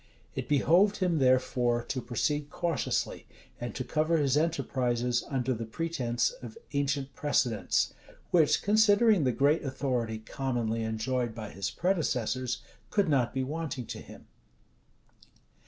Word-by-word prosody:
It -, -, -5 dB
behoved 175 Hz, +9 st, +4 dB
him, 175 Hz, -4 st, +1 dB
therefore, 125 Hz, -2 st, +2 dB
to 130 Hz, +2 st, -3 dB
proceed 145 Hz, +5 st, -1 dB
cautiously, 170 Hz, 0 st, -2 dB, 0.3 s
and 120 Hz, 0 st, -5 dB
to 130 Hz, -, -2 dB
cover 155 Hz, +5 st, +1 dB
his 140 Hz, -3 st, +2 dB
enterprises 125 Hz, -6 st, 0 dB
under 130 Hz, -2 st, 0 dB
the 115 Hz, -1 st, -5 dB
pretence 120 Hz, -4 st, -1 dB
of 120 Hz, -3 st, -9 dB, 0.2 s
ancient 140 Hz, -1 st, -1 dB
precedents, 120 Hz, -9 st, +1 dB, 0.4 s
which, 155 Hz, -4 st, +4 dB
considering 210 Hz, -, +4 dB
the 125 Hz, -, +3 dB
great 145 Hz, +6 st, +2 dB
authority 130 Hz, -5 st, -2 dB
commonly 115 Hz, -1 st, -2 dB
enjoyed 110 Hz, +2 st, -1 dB
by 110 Hz, -2 st, -6 dB
his 100 Hz, -, -3 dB
predecessors, 130 Hz, -, -1 dB, 0.3 s
could 200 Hz, -5 st, +1 dB
not 130 Hz, -5 st, +2 dB
be 130 Hz, -, -1 dB
wanting 145 Hz, -3 st, -4 dB
to -, -, -6 dB
him. -, -, -13 dB
130 Hz, 130 wpm, -29 LUFS, 120-155 Hz, 0.4 s, behoved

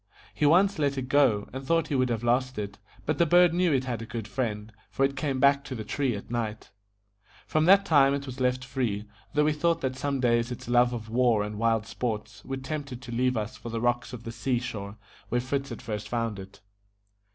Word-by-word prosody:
He 145 Hz, +9 st, +2 dB
once 190 Hz, +4 st, +4 dB
let 140 Hz, -2 st, +1 dB
it 130 Hz, -1 st, -3 dB
go, 125 Hz, -8 st, +3 dB
and 135 Hz, +1 st, -5 dB
thought 165 Hz, +2 st, +1 dB
he -, -, -2 dB
would 130 Hz, -1 st, +2 dB
have 115 Hz, -1 st, -2 dB
lost 130 Hz, +1 st, +1 dB
it, 100 Hz, -1 st, -5 dB, 0.3 s
but 155 Hz, -1 st, -1 dB
the 170 Hz, -, +5 dB
bird 175 Hz, +1 st, +6 dB
knew 180 Hz, -1 st, +2 dB
it 135 Hz, -2 st, +2 dB
had 120 Hz, -3 st, -3 dB
a -, -, -5 dB
good 110 Hz, -1 st, -5 dB
friend, 110 Hz, -4 st, -3 dB, 0.2 s
for 135 Hz, -, +1 dB
it 135 Hz, 0 st, -2 dB
came 135 Hz, -2 st, -1 dB
back 140 Hz, +1 st, +4 dB
to 130 Hz, -, -5 dB
the 110 Hz, -, -5 dB
tree 130 Hz, +2 st, -1 dB
at 100 Hz, -, -8 dB
night. 110 Hz, -2 st, -3 dB, 0.7 s
From 155 Hz, 0 st, +1 dB
that 195 Hz, +2 st, +6 dB
time 140 Hz, -6 st, +5 dB
it 140 Hz, 0 st, -4 dB
was 130 Hz, -1 st, -8 dB
left 130 Hz, 0 st, 0 dB
free, 120 Hz, -6 st, -2 dB, 0.3 s
though 150 Hz, 0 st, +4 dB
we 155 Hz, -, +3 dB
thought 165 Hz, +3 st, +1 dB
that 130 Hz, -1 st, -1 dB
some 140 Hz, +1 st, -2 dB
day 120 Hz, -2 st, +3 dB
its 120 Hz, 0 st, -5 dB
love 120 Hz, 0 st, +4 dB
of 115 Hz, -2 st, -5 dB
war 120 Hz, -3 st, +3 dB
and 105 Hz, 0 st, -5 dB
wild 115 Hz, -2 st, +2 dB
sports 115 Hz, -1 st, -4 dB
would 135 Hz, 0 st, -5 dB
tempt 145 Hz, -1 st, -4 dB
it 125 Hz, 0 st, -7 dB
to 125 Hz, -2 st, -9 dB
leave 125 Hz, +1 st, +1 dB
us 110 Hz, +2 st, -4 dB
for 115 Hz, +1 st, -8 dB
the 115 Hz, 0 st, -3 dB
rocks 120 Hz, +1 st, 0 dB
of 120 Hz, -3 st, -8 dB
the 115 Hz, -, -5 dB
sea 120 Hz, +2 st, -1 dB
shore, 105 Hz, -4 st, -5 dB, 0.3 s
where 120 Hz, -, +1 dB
Fritz 135 Hz, +2 st, -2 dB
had -, -, -8 dB
first 105 Hz, -2 st, -5 dB
found 115 Hz, -4 st, -2 dB
it. 95 Hz, +1 st, -11 dB
125 Hz, 240 wpm, -27 LUFS, 115-140 Hz, 0.7 s, bird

